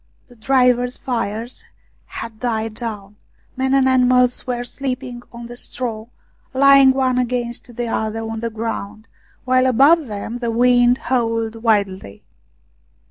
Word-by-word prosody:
The 245 - -17
drivers' 250 +1 +2
fires 235 -1 -4 0.4
had 225 -1 -8
died 225 -2 -2
down, 210 -3 -7 0.4
men 265 +1 +1
and 270 -1 +3
animals 250 -1 +3
were 245 -1 -2
sleeping 255 -1 -5
on 235 0 -9
the 240 +1 -9
straw, 230 -3 -3 0.5
lying 275 0 +7
one 260 -1 +1
against 240 -1 -3
the 240 0 -3
other 220 0 -2
on 225 0 -5
the 230 +1 -3
ground, 220 -1 -5 0.4
while 255 0 +3
above 280 +5 +4
them 215 +3 -5
the 235 -1 -2
wind 245 +1 +4
howled 230 -3 -1
wildly. 200 - -1
240 Hz, 135 wpm, -19 LUFS, 225-255 Hz, 0.5 s, lying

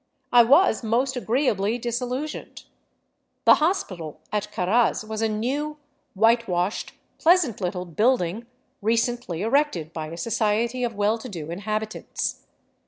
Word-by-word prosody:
I 245 - +8
was 275 - +5
most 250 +4 +1
agreeably 235 -3 0
disil 240 +1 -2
lusioned. 290 +5 -5 0.8
The - - +9
hospital 185 - -1
at 210 0 -2
Caraz 215 +4 +1
was 220 0 -4
a 225 - +2
new, 275 +8 -2 0.4
whitewashed, 210 -3 +1 0.3
pleasant 325 - +3
little 180 0 -2
building 210 +2 0 0.3
recently 230 -4 0
erected 225 - +1
by 155 -2 -4
a 165 +2 -8
society 230 +4 0
of 235 -2 -2
well 210 +3 +1
to 250 - -8
do 165 -5 -6
inhabitants. 215 +4 -4
225 Hz, 125 wpm, -24 LUFS, 195-245 Hz, 0.8 s, The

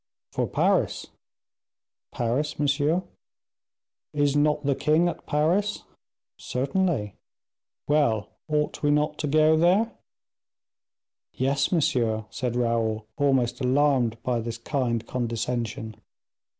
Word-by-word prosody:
"For - - -1
Paris." - - +1 1.1
"Paris, 125 +6 -1
monsieur?" 150 +4 +1 1.1
"Is 145 -1 +2
not 150 0 +2
the 140 - +3
king 155 +5 +2
at 175 - -5
Paris?" 175 +8 +1 0.6
"Certainly." 135 - -1 0.7
"Well, 125 -9 +2 0.2
ought 150 -1 -1
we 145 - +2
not 150 +1 +1
to 150 - -1
go 155 +2 +4
there?" 185 +8 +3 1.4
"Yes, 135 +2 0
monsieur," 115 - +1
said 125 -3 -3
Raoul, 115 -2 0
almost 130 -3 +1
alarmed 130 -3 +2
by 125 -2 0
this 115 0 -4
kind 120 -2 -1
condescension. 115 -2 -3
140 Hz, 100 wpm, -26 LUFS, 120-150 Hz, 1.4 s, go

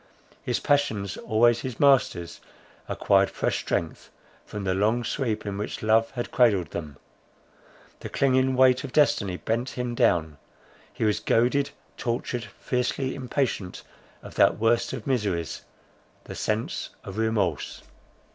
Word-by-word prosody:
His - - -1
passions, 115 - +1
always 120 +2 +3
his 130 -2 -6
masters, 135 -11 +3 0.5
acquired - - +3
fresh - - -1
strength, 80 -2 -3 0.4
from 105 -1 -6
the 95 -1 0
long 110 +5 +1
sleep 115 -2 -2
in 100 -1 -4
which 105 - -5
love 110 +1 +3
had 120 -3 -5
cradled 100 -10 +3
them, 75 -5 -6 1.0
the - - -7
clinging 130 -1 +2
weight 130 +1 +5
of 135 -3 -7
destiny 100 -11 +2
bent 120 +6 -2
him 125 -1 -2
down; 85 - +1 0.5
he - - -4
was 105 -1 +2
goaded, 130 +5 +2 0.3
tortured, 120 0 -2
fiercely 130 +1 -2
impatient 125 -8 -2 0.4
of - - -10
that - - +4
worst 115 +2 +2
of 110 - -6
miseries, 100 - -1 0.6
the - - -8
sense 110 +1 -2
of 100 +3 -6
remorse. 105 -8 -1
115 Hz, 135 wpm, -26 LUFS, 100-130 Hz, 1.0 s, weight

